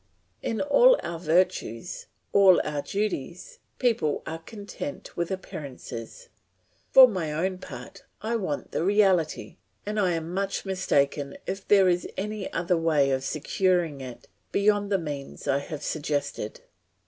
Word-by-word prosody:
In 225 - -2
all - - +6
our 170 -1 -4
virtues, 175 -4 0 0.3
all 195 -3 +7
our 150 -1 -2
duties, 185 -3 -4 0.2
people 220 - +1
are 160 0 -5
content 210 - -8
with 170 -1 -1
appearances; 140 - -7 0.6
for 260 -1 +10
my 180 -9 -2
own 180 +4 -1
part - - -10 0.2
I 225 +2 -2
want 185 -10 -3
the - - -1
reality, 185 -4 +2 0.3
and 210 +1 -2
I 185 -3 +2
am 165 +1 -3
much 195 +1 -2
mistaken 145 -7 0
if 195 +1 -5
there 195 -2 +6
is 175 -1 +1
any 210 0 -4
other 175 +1 +1
way 155 -4 +2
of 130 0 0
securing 165 0 0
it 125 -2 -9 0.2
beyond 205 0 +2
the 195 - +4
means 145 -5 -6
I 140 0 +2
have 145 +1 -7
suggested. 150 - -3
180 Hz, 140 wpm, -26 LUFS, 150-200 Hz, 0.6 s, for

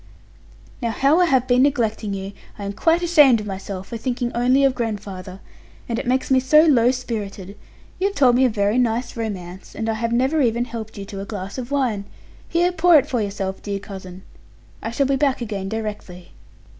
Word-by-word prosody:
Now 235 - -1
how 275 +8 +3
I 360 - +5
have 260 -6 +2
been 250 0 +4
neglecting 225 -7 0
you! 195 +1 -6 0.2
I 205 - -7
am 200 - -4
quite 330 - +2
ashamed 295 -8 +5
of 210 - -6
myself 195 -1 -6
for 230 - -4
thinking 245 0 -2
only 250 +3 +3
of 270 -1 +4
grandfather: 195 -5 -5 0.5
and 230 -1 -2
it - - -5
makes 260 +2 0
me 260 - +5
so 305 +4 +5
low 250 -7 +4
spirited. 210 -6 -4 0.4
You 385 - +2
have 400 - -5
told 255 -6 +4
me 255 - +4
a 255 - +4
very 210 +2 +1
nice 240 0 0
romance, 190 -5 -6
and 225 - -3
I 225 - +1
have 230 +1 -2
never 260 +6 +2
even 240 -1 +1
helped 225 -2 -8
you 200 - -6
to 195 0 -7
a - - -6
glass 200 +2 -6
of 245 -1 -6
wine. 250 -8 -1 0.4
Here, 345 +1 +2
pour 350 -1 +5
it 280 - +3
for 245 -3 -1
yourself, 195 -2 -4
dear 200 -1 -3
cousin; 190 -2 -10 0.6
I - - -3
shall 255 +4 0
be 270 0 +1
back 275 -1 +1
again 205 -5 -4
directly.' 205 -5 -6
230 Hz, 205 wpm, -21 LUFS, 200-260 Hz, 0.6 s, I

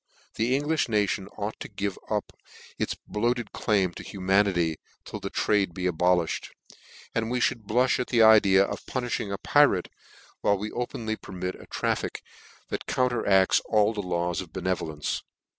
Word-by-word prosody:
The 120 +4 +1
Englim 150 -2 0
nation 105 -2 0
ought 105 +1 -4
to - - -7
give 100 -2 -3
up - - -2 0.5
its - - -1
boafted 120 +1 -1
claim 100 -4 +1
to - - -8
humanity, 95 -4 +1 0.3
till - - -6
this - - -5
trade 100 -5 +1
be 90 - -3
abolifhed; 90 -1 +1 0.6
and 115 0 -1
we 125 +1 0
fhould 115 -3 0
blulh 125 +4 +2
at 125 - -1
the 115 -2 +4
idea 105 -3 +7
of - - -6
puniihing 120 -5 -2
a 100 - -2
pirate, 145 -6 +3 0.5
while 100 - +2
we 105 +2 -5
openly 115 -2 -3
permit 90 0 -5
a - - -13
traffic - - -2 0.5
that - - -4
counteracts 110 -7 +3
all 105 0 +3
the 105 - -3
laws 90 -1 -1
of 90 -4 -10
benevolence. 80 -5 -2
105 Hz, 160 wpm, -27 LUFS, 95-115 Hz, 0.6 s, idea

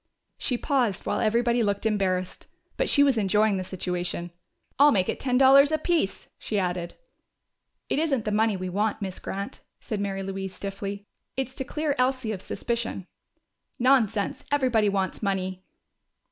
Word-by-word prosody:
She 250 - 0
paused, 245 - 0
while - - 0
everybody 235 +2 +2
looked 200 -1 0
embarrassed. 190 -4 -1 0.3
But - - 0
she 285 - +6
was 270 -5 +3
enjoying 210 0 +2
the 185 - -2
situation. 180 -1 -3 0.5
"I'll 290 +1 +8
make 185 -3 +2
it - - -2
ten 250 -2 +1
dollars 275 +2 +7
apiece!" 315 - 0
she 215 - -3
added. 180 -2 -2 0.9
"It - - 0
isn't 275 -8 0
the 210 - -1
money 215 -1 +2
we 185 0 -4
want, 205 +3 -1
Miss 190 -2 -5
Grant," 200 +1 -5 0.2
said 215 - -4
Mary 195 -1 -2
Louise 190 -1 -5
stiffly. 200 0 -5 0.3
"It's 265 -1 -2
to 265 - -4
clear 300 +2 -1
Elsie 255 -3 +1
of 195 -4 -5
suspicion." 235 -5 -3 0.7
"Nonsense! 240 -6 +2
Everybody 250 -7 +3
wants 195 -1 -1
money!" 190 -2 -2
210 Hz, 155 wpm, -26 LUFS, 195-255 Hz, 0.9 s, I'll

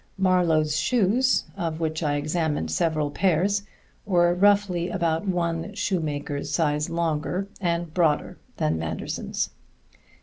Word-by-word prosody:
Marlowe's 170 -5 +2
shoes 245 +2 +2
(of 165 -2 -3
which 160 0 -2
I 145 -2 +1
examined 150 - -1
several 155 - 0
pairs) 195 +4 +2 0.4
were 175 -3 +3
roughly 190 -2 +3
about 170 +1 -1
one 175 +1 -1
shoemaker's 150 -8 -2
size 150 -2 +1
longer 170 +3 -1
and 170 -2 -1
broader 160 -4 +1 0.2
than 80 +1 0
Manderson's. 80 0 -3
170 Hz, 110 wpm, -25 LUFS, 155-185 Hz, 0.4 s, were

